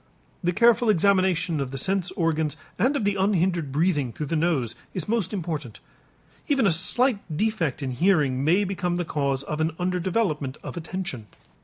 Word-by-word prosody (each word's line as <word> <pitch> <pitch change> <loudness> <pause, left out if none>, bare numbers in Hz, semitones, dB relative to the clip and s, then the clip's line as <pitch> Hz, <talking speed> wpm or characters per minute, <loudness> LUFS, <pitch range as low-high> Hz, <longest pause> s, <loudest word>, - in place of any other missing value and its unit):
The 175 - +2
careful 235 +3 +4
examination 185 -4 +2
of 135 -2 -2
the 135 - -6
sense 190 +5 0
organs 160 -3 0 0.2
and 255 +8 +2
of 275 - 0
the 205 0 +2
unhindered 185 -6 +1
breathing 150 -4 +1
through 150 - -5
the 165 - -2
nose 155 -8 0 0.2
is 180 -5 -3
most 225 -4 0
important. 155 - -4 0.7
Even 275 -5 +2
a 195 - +4
slight 230 - +3 0.2
defect 175 - -1
in 130 - -2
hearing 140 -3 +2
may 175 +7 +3
become 180 -2 -2
the 175 0 -2
cause 140 -3 -1
of 150 +2 -3
an 160 0 0
under 180 0 -1
development 170 -8 -1
of - - -7
attention. 170 - -5
175 Hz, 175 wpm, -25 LUFS, 150-195 Hz, 0.7 s, careful